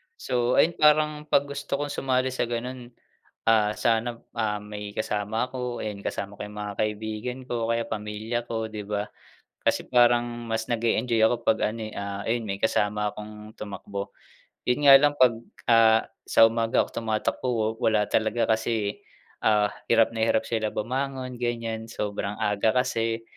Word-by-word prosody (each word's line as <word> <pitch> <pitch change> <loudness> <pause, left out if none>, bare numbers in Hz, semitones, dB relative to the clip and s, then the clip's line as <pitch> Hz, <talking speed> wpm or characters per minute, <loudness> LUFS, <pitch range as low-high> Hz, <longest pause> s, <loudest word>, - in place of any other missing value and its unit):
So, 125 - 0
ayun, 170 - +5
parang 150 0 +3
'pag 140 - +4
gusto 140 0 -3
kong 145 +1 -3
sumali 130 -1 0
sa 125 -2 -1
ganun, 120 +1 -4 0.6
ah, 110 -2 +4
sana, 115 +2 0 0.2
ah, 110 -2 -1
may 105 0 -7
kasama 105 +2 -2
ako, 125 -2 -4
ayun, 105 -2 -5
kasama 100 +1 -4
ko - - -7
yung 105 0 -8
mga 105 0 -4
kaibigan 110 +4 -3
ko 120 -2 -1
o - - -3
kaya 115 0 -1
pamilya 110 +2 -3
ko, 115 -1 -3
'di 110 -1 -6
ba? 105 +1 -3 0.6
Kasi - - +1
parang 120 -1 +4 0.2
mas 110 0 -1
nag-e-enjoy 115 0 +1
ako 115 +1 +2
'pag 110 -1 +2
ano, 115 +1 -7
eh, 110 - -9
ah, 100 0 -5
ayun, 115 0 0
may 100 - -3
kasama 105 +1 0
akong 105 0 -10
tumakbo. 100 -1 -6 0.6
Yun 125 +4 +1
nga 140 - +10
lang 145 +1 +3
'pag, 125 -4 +5 0.4
ah, 110 -1 +6 0.2
sa - - +6
umaga 115 0 +2
ako - - -6
tumatakbo 110 +2 -1
wa 115 -3 +1
wala 110 -1 +3
talaga 110 +1 +1
kasi, 110 -2 0 0.4
ah, 105 -1 +3 0.2
hirap 115 -1 +4
na 115 - -5
hirap - - +2
sila 110 -2 -1
bumangon, 130 +3 -3
ganyan, 115 -2 -3
sobrang 105 -2 -3
aga 105 +2 +1
kasi. 115 -2 -2
115 Hz, 165 wpm, -26 LUFS, 105-120 Hz, 0.6 s, nga